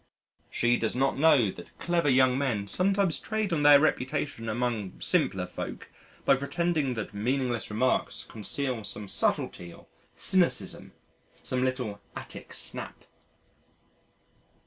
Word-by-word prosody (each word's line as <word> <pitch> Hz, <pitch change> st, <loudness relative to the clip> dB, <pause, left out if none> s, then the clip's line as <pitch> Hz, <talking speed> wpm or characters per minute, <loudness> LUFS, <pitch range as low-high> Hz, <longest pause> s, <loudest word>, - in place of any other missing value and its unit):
She 120 Hz, 0 st, +2 dB
does 115 Hz, -, 0 dB
not 135 Hz, +1 st, +1 dB
know 140 Hz, -9 st, +5 dB
that 85 Hz, -, -13 dB
clever 170 Hz, -3 st, +1 dB
young 130 Hz, -1 st, +4 dB
men 125 Hz, -7 st, -1 dB
sometimes 195 Hz, -, +2 dB
trade 215 Hz, -4 st, -2 dB
on 155 Hz, -, +1 dB
their 145 Hz, -1 st, +8 dB
reputation 135 Hz, -4 st, -1 dB
among 110 Hz, -4 st, -2 dB
simpler -, -, +2 dB
folk -, -, -7 dB, 0.3 s
by 135 Hz, -, +5 dB
pretending 150 Hz, -2 st, -1 dB
that 110 Hz, -1 st, -5 dB
meaningless 120 Hz, +2 st, -1 dB
remarks 120 Hz, +4 st, 0 dB
conceal 120 Hz, +2 st, -3 dB
some 105 Hz, 0 st, -4 dB
subtlety 90 Hz, -2 st, 0 dB
or -, -, -15 dB, 0.3 s
cynicism, 130 Hz, -, 0 dB, 0.5 s
some 130 Hz, 0 st, -1 dB
little 125 Hz, -6 st, -2 dB
Attic -, -, -9 dB
snap. -, -, -1 dB
130 Hz, 125 wpm, -28 LUFS, 110-145 Hz, 0.5 s, their